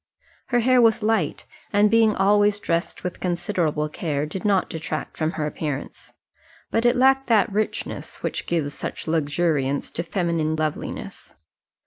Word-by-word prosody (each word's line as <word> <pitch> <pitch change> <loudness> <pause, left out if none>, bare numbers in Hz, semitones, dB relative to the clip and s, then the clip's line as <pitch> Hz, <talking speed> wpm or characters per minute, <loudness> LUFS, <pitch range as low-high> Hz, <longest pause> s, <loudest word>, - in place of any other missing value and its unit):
Her 240 -2 +2
hair 255 +1 +4
was 225 -1 +4
light, 215 -9 0 0.3
and 205 0 +4
being 225 -2 +4
always 205 +1 +3
dressed 170 -3 -2
with 180 - -4
considerable 175 -4 -1
care, 150 -2 -2
did 170 +5 -6
not 200 -3 +2
detract 160 -2 -5
from 160 +1 -1
her 155 - -2
appearance; 150 -2 -5 0.6
but 225 +1 +1
it 240 - +3
lacked 270 +1 +4
that 220 -3 +3
richness 215 +2 -3
which - - -3
gives 155 -4 -1
such - - -6
luxuriance 145 -3 0
to - - -2
feminine 170 -3 -1
loveliness. 155 -1 -4
175 Hz, 145 wpm, -23 LUFS, 155-215 Hz, 0.6 s, hair